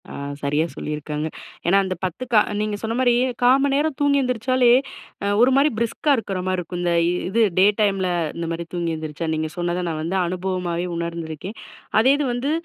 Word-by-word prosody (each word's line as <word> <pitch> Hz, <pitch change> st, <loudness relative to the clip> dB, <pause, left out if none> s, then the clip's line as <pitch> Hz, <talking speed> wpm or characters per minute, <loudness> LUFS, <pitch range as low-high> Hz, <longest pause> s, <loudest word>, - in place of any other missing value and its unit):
ஆ -, -, -9 dB, 0.3 s
சரியா 145 Hz, +3 st, +1 dB
சொல்லிருக்காங்க. 150 Hz, 0 st, -4 dB, 0.4 s
ஏன்னா, 190 Hz, +3 st, +5 dB
அந்த 185 Hz, 0 st, -2 dB
10, 185 Hz, +7 st, -3 dB
கா 215 Hz, -, +8 dB, 0.2 s
நீங்க 215 Hz, -1 st, -1 dB
சொன்ன 225 Hz, +1 st, -1 dB
மாரி, 250 Hz, -2 st, +4 dB, 0.3 s
1/4 255 Hz, +2 st, +6 dB
மணி 280 Hz, -1 st, +2 dB
நேரம் 295 Hz, 0 st, 0 dB
தூங்கி 285 Hz, -1 st, +3 dB
எந்திரிச்சாலே, 250 Hz, 0 st, +2 dB, 0.7 s
ஒரு 250 Hz, +2 st, +5 dB
மாரி 280 Hz, +2 st, +4 dB
பிரிஸ்கா 235 Hz, +6 st, 0 dB
இருக்கிற 195 Hz, -4 st, -3 dB
மாரி 185 Hz, 0 st, 0 dB
இருக்கும். 175 Hz, 0 st, -5 dB
இந்த 175 Hz, -1 st, +1 dB, 0.4 s
இது 230 Hz, +4 st, +2 dB, 0.2 s
டே 190 Hz, -, +7 dB, 0.2 s
டைம்ல, 195 Hz, -3 st, +2 dB, 0.3 s
இந்த 170 Hz, -, -3 dB
மாதிரி 165 Hz, 0 st, -3 dB
தூங்கி 170 Hz, -1 st, -1 dB
எழுந்திரிச்சா, 155 Hz, 0 st, -5 dB
நீங்க 155 Hz, 0 st, -1 dB
சொன்னத, 175 Hz, +1 st, -1 dB
நான் 160 Hz, -2 st, -3 dB
வந்து 170 Hz, +4 st, -2 dB
அனுபவமாவே 180 Hz, -1 st, -2 dB
உணர்ந்துருக்கேன். 170 Hz, +3 st, -5 dB, 0.4 s
அதே 260 Hz, +5 st, +5 dB
இது 295 Hz, -, 0 dB
வந்து, 255 Hz, +4 st, -1 dB
185 Hz, 180 wpm, -22 LUFS, 170-245 Hz, 0.7 s, கா